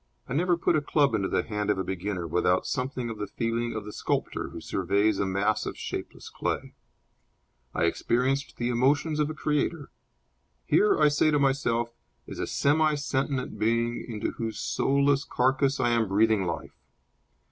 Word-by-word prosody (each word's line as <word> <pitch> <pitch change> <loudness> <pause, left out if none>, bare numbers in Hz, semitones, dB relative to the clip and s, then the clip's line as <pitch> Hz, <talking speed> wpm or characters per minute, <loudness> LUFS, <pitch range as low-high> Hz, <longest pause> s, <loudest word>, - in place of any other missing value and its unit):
I - - -4
never 175 +4 +2
put 170 - +2
a 155 - +2
club 145 -3 +2
into 100 -3 +1
the - - 0
hand 105 -1 -3
of 105 - +2
a 95 - -1
beginner 95 0 -3
without 90 +2 +1
something 125 -2 -2
of 110 - -8
the 105 - -3
feeling 115 +2 -2
of 110 -2 -4
the 105 - -8
sculptor - - -2
who - - -8
surveys 100 +1 +1
a 100 - +1
mass 100 +3 0
of - - -5
shapeless - - -6
clay. - - -3 1.0
I - - +1
experience 125 +10 +1
the 120 0 -3
emotions 145 +6 +2
of 150 0 +1
a 155 - -5
creator. 150 0 -1 0.7
Here, 210 - +4
I 150 - +6
say 145 +1 +3
to 150 - +3
myself, 120 -4 +1 0.3
is - - -8
a - - -2
semi 155 +2 +2
sentient 135 -5 -2
being 115 +2 +1
into 110 -3 -2
whose 115 -1 -4
soulless 140 0 +2
carcass 135 +2 +1
I 120 - +2
am 115 -2 +2
breathing 105 -1 +2
life. 80 -3 -5
120 Hz, 175 wpm, -27 LUFS, 105-140 Hz, 1.0 s, I